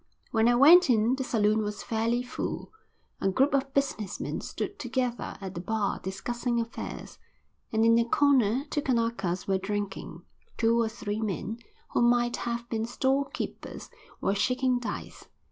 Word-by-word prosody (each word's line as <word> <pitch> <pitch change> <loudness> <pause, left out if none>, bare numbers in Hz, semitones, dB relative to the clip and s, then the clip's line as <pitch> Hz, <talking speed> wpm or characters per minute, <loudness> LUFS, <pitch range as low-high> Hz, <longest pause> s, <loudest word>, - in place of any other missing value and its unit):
When 225 0 +3
I 240 - +5
went 315 +6 +8
in 230 0 +4
the 265 - -3
saloon 215 -3 +2
was 210 -1 -4
fairly 230 +2 0
full. 250 - -5 0.5
A 195 - +1
group 270 +10 +2
of 275 0 +1
business 265 -8 -1
men - - -3
stood 405 - -5
together 250 -1 -2
at 190 -2 -6
the 175 - -5
bar, 215 +1 -1
discussing 235 +5 -2
affairs, 230 +1 -6 0.5
and 220 0 +3
in 230 0 +6
a 230 - +2
corner 260 -1 +3
two 295 - 0
Kanakas 230 -8 -1
were 190 -1 +2
drinking. 195 -3 -4 0.3
Two 230 +1 +3
or 225 - +1
three 215 -1 -4
men 215 +2 -3 0.3
who - - +1
might 240 0 +3
have 235 0 -3
been 225 -2 -2
store 265 +3 +1
keepers - - -6 0.3
were 195 - +1
shaking 250 +4 +1
dice. 245 - -6
230 Hz, 160 wpm, -28 LUFS, 210-250 Hz, 0.5 s, went